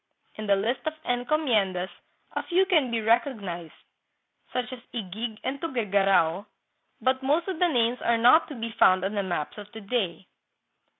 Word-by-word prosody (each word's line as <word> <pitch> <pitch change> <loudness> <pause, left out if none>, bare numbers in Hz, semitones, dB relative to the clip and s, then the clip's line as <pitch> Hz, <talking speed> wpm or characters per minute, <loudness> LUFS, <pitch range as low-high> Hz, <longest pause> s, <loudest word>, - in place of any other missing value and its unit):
In 215 0 -6
the 200 - +5
list 230 +6 -1
of 310 - 0
encomiendas 240 - 0 0.4
a - - -2
few 370 +2 +2
can 320 -9 +2
be 235 - -1
recog 230 +3 +2
nized, 175 -4 -7 0.7
such 250 0 -3
as 255 - -8
Yguig 220 +1 -5
and 270 +2 -3
Tuguegarao, 200 - +1 0.5
but 260 0 +1
most 300 +6 +1
of 370 -4 -3
the 360 - +4
names 240 -5 +1
are 235 0 +2
not 250 +8 +6
to 295 - -8
be 230 -1 -4
found 185 -3 +4
on 200 - -2 0.2
maps 170 +3 -3
of 210 0 -11
to 220 - -8
day. 195 -4 -2
230 Hz, 170 wpm, -26 LUFS, 195-260 Hz, 0.7 s, not